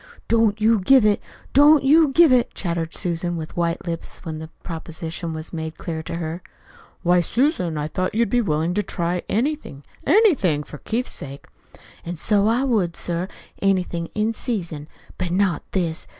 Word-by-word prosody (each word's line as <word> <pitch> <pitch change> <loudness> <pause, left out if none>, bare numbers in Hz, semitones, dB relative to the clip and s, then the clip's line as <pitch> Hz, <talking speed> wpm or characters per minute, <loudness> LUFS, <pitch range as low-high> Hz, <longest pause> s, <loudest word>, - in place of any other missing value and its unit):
"Don't 225 -2 +2
you 220 0 +4
give 250 +5 +5
it, 210 -1 +3 0.3
don't 290 +1 +7
you 310 +4 +6
give 315 +2 +5
it!" 250 -2 +3
chattered 170 -3 -3
Susan, 175 0 -1
with 160 0 -7
white 170 -1 -1
lips, 170 +1 -5
when 160 -2 -4
the 160 - -7 0.2
proposition 165 0 -6
was 155 +1 -7
made 160 -1 -5
clear 160 -2 -4
to 165 - -6
her. 165 +1 -4 0.6
"Why, 175 0 +4
Susan, 205 - 0
I 150 0 -2
thought 185 +5 -2
you'd 235 +1 +3
be 245 - +3
willing 160 -3 0
to 210 - +1
try 175 -2 -2
anything, 240 - -2 0.2
ANYTHING 260 - +4
for 150 - -11
Keith's 240 +3 -2
sake." 140 0 -7 0.6
"An' 175 +1 -5
so 205 +4 +2
I 235 +4 +2
would, 205 -11 +1
sir, 175 +1 -2 0.3
anything 180 -3 0
in 215 +1 +1
season. 170 - -4 0.3
But 185 -2 -1
not 185 0 +1
this. 170 -4 -2
180 Hz, 170 wpm, -22 LUFS, 165-225 Hz, 0.6 s, don't